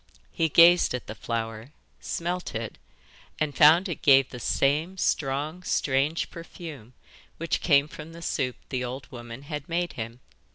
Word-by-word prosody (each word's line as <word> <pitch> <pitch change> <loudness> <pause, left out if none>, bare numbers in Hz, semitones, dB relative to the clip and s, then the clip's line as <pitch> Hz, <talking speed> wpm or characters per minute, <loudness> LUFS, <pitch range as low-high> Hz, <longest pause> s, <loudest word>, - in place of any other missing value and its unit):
He 165 -1 0
gazed 170 -2 +6
at 125 - -6
the 110 - -6
flower, 115 +3 -5 0.3
smelt 175 -2 -3
it, 110 -1 -5 0.6
and 150 -2 -1
found 165 +6 +6
it 175 - -5
gave 135 -2 +5
the 125 - -7
same 150 +9 +1
strong 150 +2 -1
strange 145 -1 0
perfume 160 -8 -10 0.4
which 165 +1 -1
came 145 -3 +4
from 155 +1 -10
the 170 0 -10
soup 130 -6 -1
the 130 -2 -2
old 125 +1 -5
woman 120 +1 -9
had 150 0 -6
made 175 0 -1
him. 115 +1 -6
145 Hz, 155 wpm, -26 LUFS, 125-165 Hz, 0.6 s, gazed